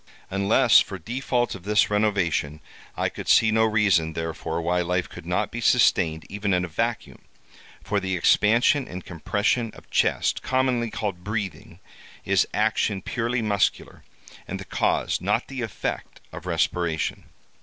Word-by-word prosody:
Unless 100 +4 +5
for 95 - -2
default 120 +5 -2
of 95 - -9
this 105 +2 +2
renovation, 100 -8 0 0.4
I - - +1
could - - -8
see 110 -1 +5
no 110 0 +3
reason, 100 -7 +2
therefore, 80 0 -4
why 90 +2 0
life 90 +1 -1
could 90 -2 -11
not 90 0 -1
be 120 - -5
sustained 85 -10 +3
even 100 -1 -1
in 90 0 0
a - - -7
vacuum; 115 +7 -3 0.6
for 100 - 0
the 95 -1 -2
expansion 115 - +3
and 90 0 -8
compression 105 +7 -1
of - - -16
chest, - - +1
commonly 130 -3 0
called 100 -5 -4
breathing, 100 -4 -5 0.5
is 95 -1 +2
action 105 -2 0
purely 120 0 -2
muscular, 100 -2 -1 0.4
and - - -5
the - - -8
cause, - - 0
not - - 0
the 135 -2 -5
effect, 115 -4 -5
of - - -9
respiration. 85 -3 -1
100 Hz, 150 wpm, -24 LUFS, 90-115 Hz, 0.6 s, Unless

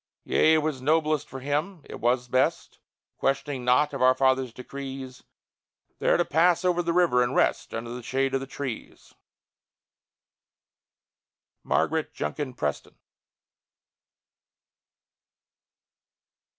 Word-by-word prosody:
Yea, 160 0 +4
it 155 - +1
was 150 -4 -2
noblest 155 +1 +1
for 135 0 -8
him 150 +6 -2
it - - -8
was 125 +1 +1
best 130 +1 0 0.4
(Questioning 135 -1 -1
naught 125 +4 +3
of 135 - -4
our 130 0 +5
Father's 130 -1 +2
decrees), 130 0 -8 0.8
There - - +3
to - - +1
pass 170 +3 +3
over 175 -1 +2
the 170 -1 -1
river 170 -8 +3
and 125 - 0
rest - - +1
Under 115 +1 -5
the 125 - -6
shade 135 +2 -1
of 135 - +1
the 135 - -6
trees! 135 -4 -7 2.5
MARGARET 160 0 0
JUNKIN 140 -5 -4
PRESTON. 75 - -4
135 Hz, 115 wpm, -26 LUFS, 130-155 Hz, 2.5 s, our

